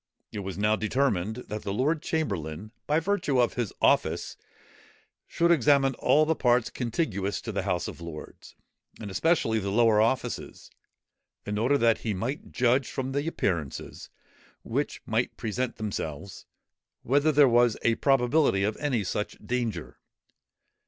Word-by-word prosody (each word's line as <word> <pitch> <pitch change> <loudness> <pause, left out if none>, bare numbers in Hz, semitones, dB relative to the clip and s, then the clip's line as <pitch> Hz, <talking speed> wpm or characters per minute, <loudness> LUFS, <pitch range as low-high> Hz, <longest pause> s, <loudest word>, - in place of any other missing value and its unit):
It 105 - -5
was 95 -2 -5
now 105 +1 +2
determined, 110 -3 0
that 105 0 -5
the 100 - -4
lord 145 +9 0
chamberlain, 100 - -3 0.2
by 150 +2 +3
virtue 165 -7 0
of 120 - +2
his 120 -5 -2
office, - - +1 0.9
should 170 0 +2
examine 140 -2 +4
all 155 +1 +4
the 160 - +2
parts 120 -5 +2
contiguous 105 - -2
to - - -5
the - - -2
House - - -1
of - - -8
Lords, 85 -2 -10 0.4
and 105 -3 -7
especially 115 - +1
the 100 -1 -3
lower 110 0 +4
offices, 120 +1 -2 0.7
in 105 0 -2
order 130 +6 +3
that 115 -3 +3
he 110 -3 -2
might 120 +10 -4
judge, 125 +1 +2
from 130 0 -3
the 140 +3 -2
appearances, 85 - -3 0.5
which - - -3
might - - -1
present 120 +3 -2
themselves, 100 -4 -5 0.6
whether 145 +5 +3
there 145 -1 +6
was 120 -2 +3
a 115 - +3
probability 135 -4 +2
of 105 +1 -1
any 130 -8 -1
such 105 +3 -3
danger. 115 -9 -3
120 Hz, 145 wpm, -27 LUFS, 105-140 Hz, 0.9 s, there